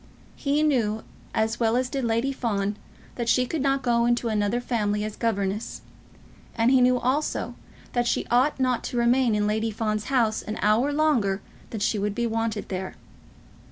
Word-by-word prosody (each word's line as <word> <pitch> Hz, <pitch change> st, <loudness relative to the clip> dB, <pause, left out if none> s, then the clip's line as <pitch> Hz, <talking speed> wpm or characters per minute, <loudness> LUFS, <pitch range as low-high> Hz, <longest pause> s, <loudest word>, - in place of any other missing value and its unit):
He 290 Hz, +2 st, 0 dB
knew, 225 Hz, -8 st, +1 dB, 0.3 s
as 220 Hz, +1 st, 0 dB
well 230 Hz, 0 st, +2 dB
as 255 Hz, 0 st, +1 dB
did 270 Hz, +1 st, -3 dB
Lady 230 Hz, +4 st, 0 dB
Fawn, 205 Hz, -5 st, -1 dB, 0.4 s
that 235 Hz, -1 st, -1 dB
she 250 Hz, +2 st, +3 dB
could 310 Hz, +3 st, -3 dB
not 275 Hz, -1 st, +1 dB
go 235 Hz, -1 st, +2 dB
into 240 Hz, -1 st, +1 dB
another 210 Hz, +2 st, 0 dB
family 210 Hz, -4 st, -1 dB
as 215 Hz, -1 st, -4 dB
governess; 205 Hz, -2 st, -2 dB, 0.7 s
and 230 Hz, +2 st, +3 dB
he 260 Hz, -1 st, +5 dB
knew 250 Hz, 0 st, +4 dB
also 265 Hz, +5 st, -1 dB, 0.4 s
that 240 Hz, -1 st, +1 dB
she -, -, 0 dB
ought 260 Hz, +4 st, +3 dB
not 255 Hz, -2 st, +1 dB
to 245 Hz, -, -3 dB
remain 240 Hz, -1 st, +3 dB
in 210 Hz, 0 st, +1 dB
Lady 220 Hz, +2 st, 0 dB
Fawn's 215 Hz, -1 st, -2 dB
house 235 Hz, -5 st, +1 dB
an 215 Hz, -, -5 dB
hour 220 Hz, +7 st, +3 dB
longer 275 Hz, -11 st, +2 dB, 0.3 s
than 220 Hz, -, -5 dB
she 210 Hz, +1 st, +1 dB
would 205 Hz, 0 st, -1 dB
be 235 Hz, -, 0 dB
wanted 225 Hz, -2 st, -2 dB
there. 190 Hz, 0 st, -4 dB
230 Hz, 180 wpm, -25 LUFS, 215-255 Hz, 0.7 s, he